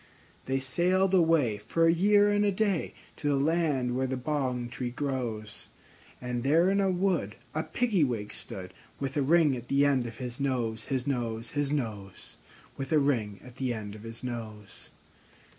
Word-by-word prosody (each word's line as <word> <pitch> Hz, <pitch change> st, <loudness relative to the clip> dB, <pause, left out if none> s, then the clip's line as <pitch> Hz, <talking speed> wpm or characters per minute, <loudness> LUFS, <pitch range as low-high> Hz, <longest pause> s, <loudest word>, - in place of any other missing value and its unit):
They 135 Hz, 0 st, +1 dB
sailed 180 Hz, +8 st, +1 dB
away, 160 Hz, -, +3 dB
for 165 Hz, +11 st, +1 dB
a 165 Hz, -, +5 dB
year 205 Hz, +3 st, +4 dB
and 205 Hz, 0 st, +2 dB
a 205 Hz, -, +3 dB
day, 195 Hz, -3 st, 0 dB, 0.2 s
To 145 Hz, -, -3 dB
the 145 Hz, -, +3 dB
land 140 Hz, -4 st, +1 dB
where 130 Hz, +1 st, 0 dB
the 130 Hz, 0 st, -2 dB
bong 130 Hz, -3 st, -1 dB
tree 125 Hz, 0 st, -4 dB
grows; 120 Hz, -5 st, -4 dB, 0.5 s
And 125 Hz, -1 st, -3 dB
there 165 Hz, +8 st, +4 dB
in 200 Hz, 0 st, +2 dB
a 195 Hz, -, +2 dB
wood 180 Hz, -, 0 dB, 0.2 s
a 155 Hz, -, 0 dB
Piggy 215 Hz, -3 st, +1 dB
wig 115 Hz, -6 st, -2 dB
stood, 90 Hz, -2 st, -6 dB, 0.3 s
With 135 Hz, -1 st, -3 dB
a 145 Hz, -, +2 dB
ring 150 Hz, 0 st, +4 dB
at 120 Hz, -1 st, -8 dB
the 140 Hz, +1 st, +3 dB
end 135 Hz, -4 st, +2 dB
of 115 Hz, -1 st, -9 dB
his 125 Hz, 0 st, -6 dB
nose, 120 Hz, -5 st, -1 dB
His 130 Hz, -2 st, -2 dB
nose, 115 Hz, -4 st, -2 dB
His 145 Hz, -1 st, -1 dB
nose, 105 Hz, -9 st, -4 dB, 0.4 s
With 135 Hz, -1 st, -5 dB
a 155 Hz, -, +5 dB
ring 115 Hz, -9 st, +1 dB
at 125 Hz, 0 st, -13 dB
the 130 Hz, -3 st, -1 dB
end 105 Hz, -2 st, -6 dB
of 105 Hz, -, -10 dB
his 115 Hz, +2 st, -8 dB
nose. 110 Hz, -5 st, -7 dB
135 Hz, 185 wpm, -29 LUFS, 120-160 Hz, 0.5 s, a